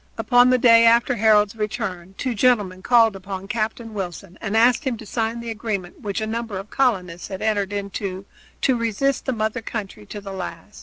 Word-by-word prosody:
Upon 245 Hz, 0 st, +4 dB
the 255 Hz, -, +4 dB
day 230 Hz, -2 st, +6 dB
after 235 Hz, +2 st, +4 dB
Harold's 215 Hz, -2 st, +3 dB
return 190 Hz, -4 st, -4 dB
two 255 Hz, -, -2 dB
gentlemen 205 Hz, -5 st, +2 dB
called 230 Hz, -1 st, +4 dB
upon 195 Hz, 0 st, -7 dB
Captain 225 Hz, +1 st, -3 dB
Wilson 185 Hz, -2 st, -6 dB
and 220 Hz, 0 st, -1 dB
asked 240 Hz, +5 st, +4 dB
him 260 Hz, -5 st, -2 dB
to 220 Hz, -, -11 dB
sign 225 Hz, +2 st, -2 dB
the 235 Hz, -1 st, -5 dB
agreement 210 Hz, -5 st, -4 dB
which 205 Hz, 0 st, -3 dB
a -, -, -1 dB
number 225 Hz, -2 st, -4 dB
of 195 Hz, +2 st, -8 dB
colonists 185 Hz, -10 st, 0 dB
had 190 Hz, -, -6 dB
entered 205 Hz, -3 st, 0 dB
into 195 Hz, -1 st, -4 dB, 0.4 s
to 260 Hz, -, +3 dB
resist 230 Hz, +4 st, 0 dB
the -, -, +2 dB
mother 220 Hz, +1 st, -2 dB
country 200 Hz, -, -6 dB
to 210 Hz, -, -7 dB
the 195 Hz, -1 st, -8 dB
last. 180 Hz, +1 st, -7 dB
215 Hz, 195 wpm, -22 LUFS, 195-235 Hz, 0.4 s, day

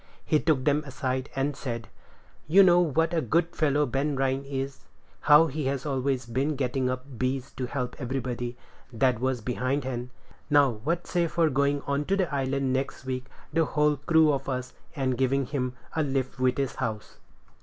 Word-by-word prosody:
He 155 Hz, -, +3 dB
took 145 Hz, -5 st, +1 dB
them 150 Hz, 0 st, +2 dB
aside, 130 Hz, 0 st, -2 dB
and 135 Hz, +1 st, 0 dB
said, 115 Hz, -4 st, -5 dB, 0.6 s
"You 190 Hz, +6 st, +7 dB
know 175 Hz, -1 st, +6 dB
what 165 Hz, 0 st, +1 dB
a 165 Hz, -, +2 dB
good 170 Hz, +2 st, 0 dB
fellow 150 Hz, -1 st, +2 dB
Ben 140 Hz, +3 st, -1 dB
Rhines 135 Hz, +1 st, 0 dB
is; 135 Hz, 0 st, -4 dB, 0.4 s
how 150 Hz, +2 st, +7 dB
he 150 Hz, -1 st, -3 dB
has 135 Hz, 0 st, -1 dB
always 135 Hz, -2 st, -1 dB
been 135 Hz, +6 st, -1 dB
getting 130 Hz, -1 st, 0 dB
up 130 Hz, 0 st, -6 dB
'bees' 130 Hz, +1 st, -1 dB
to 125 Hz, -, -4 dB
help 125 Hz, -2 st, -3 dB
everybody 125 Hz, -2 st, -3 dB, 0.3 s
that 125 Hz, 0 st, +2 dB
was 130 Hz, -1 st, -1 dB
behindhand: 125 Hz, +1 st, -2 dB, 0.4 s
now, 145 Hz, -3 st, +5 dB
what 155 Hz, +11 st, -2 dB
say 175 Hz, -2 st, +1 dB
for 165 Hz, -1 st, +2 dB
going 140 Hz, +1 st, +1 dB
on 140 Hz, +1 st, -1 dB
to 195 Hz, +4 st, +1 dB
the 180 Hz, -6 st, 0 dB
island 135 Hz, -1 st, 0 dB
next 135 Hz, 0 st, -3 dB
week, 130 Hz, -1 st, -3 dB, 0.3 s
the 165 Hz, +1 st, +3 dB
whole 150 Hz, 0 st, +2 dB
crew 155 Hz, +1 st, +4 dB
of 135 Hz, 0 st, -3 dB
us, 130 Hz, -1 st, -3 dB, 0.2 s
and 130 Hz, -3 st, -1 dB
giving 135 Hz, +1 st, +2 dB
him 125 Hz, -2 st, -2 dB, 0.2 s
a 160 Hz, -, +2 dB
lift 135 Hz, -3 st, -2 dB
with 130 Hz, -1 st, +2 dB
his 135 Hz, -2 st, -1 dB
house?" 110 Hz, -1 st, -4 dB
135 Hz, 180 wpm, -27 LUFS, 130-150 Hz, 0.6 s, You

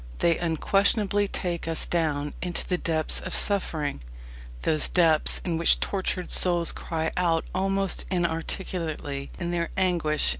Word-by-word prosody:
They 165 Hz, -, +2 dB
unquestionably 200 Hz, +4 st, +2 dB
take 175 Hz, -3 st, -3 dB
us 165 Hz, -1 st, -1 dB
down 150 Hz, -4 st, -1 dB
into 175 Hz, -1 st, -3 dB
the 180 Hz, -1 st, 0 dB
depths 160 Hz, -2 st, 0 dB
of 185 Hz, -, -3 dB
suffering 155 Hz, -, -1 dB, 0.6 s
those 155 Hz, -1 st, +2 dB
depths 165 Hz, -4 st, +3 dB
in 165 Hz, -3 st, -1 dB
which 170 Hz, -, +4 dB
tortured 185 Hz, -2 st, -2 dB
souls 175 Hz, -2 st, +4 dB
cry 160 Hz, -1 st, -3 dB
out 170 Hz, -2 st, +1 dB
almost 195 Hz, 0 st, 0 dB
inarticulately 165 Hz, -4 st, -3 dB
in 175 Hz, -1 st, -3 dB
their 170 Hz, -1 st, -1 dB
anguish. 170 Hz, -5 st, +2 dB
170 Hz, 135 wpm, -26 LUFS, 160-185 Hz, 0.6 s, which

